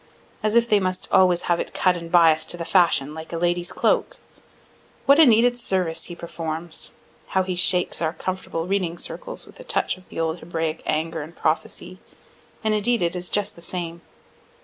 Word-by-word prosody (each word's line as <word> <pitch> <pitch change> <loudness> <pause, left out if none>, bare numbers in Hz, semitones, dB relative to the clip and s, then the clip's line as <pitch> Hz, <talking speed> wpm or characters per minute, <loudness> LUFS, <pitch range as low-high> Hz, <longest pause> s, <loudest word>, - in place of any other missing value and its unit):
As 215 +1 0
if 235 0 +5
they 210 -3 +4
must 185 -1 -2
always 180 -2 +4
have 175 -1 +1
it - - -5
cut 185 -1 +3
and 170 -1 -7
bias'd 160 -2 +5
to 175 - -2
the 170 - -4
fashion, 160 -6 +3
like 160 0 -8
a 170 - -3
lady's 175 +1 0
cloak! - - +1 0.9
What 280 +2 +6
a 315 - +8
needed 245 +1 +4
service 180 -7 -1
he 175 - -8
performs! 165 -1 -5 0.3
How 190 0 +1
he 185 -1 -3
shakes 180 -1 +1
our 160 -1 0
comfortable 180 -1 -4
reading 180 -3 -1
circles - - -6
with - - -17
a - - -9
touch - - 0
of 185 - -19
the - - -7
old 165 +1 -1
Hebraic 165 -2 -3
anger 160 +1 -1
and 160 +3 -9
prophecy 175 +3 -2 0.6
and 215 -1 +2
indeed 220 0 +1
it 170 +1 0
is 180 0 -4
just 205 -1 -1
the 170 - -14
same. 170 -1 -3
175 Hz, 195 wpm, -23 LUFS, 165-190 Hz, 0.9 s, a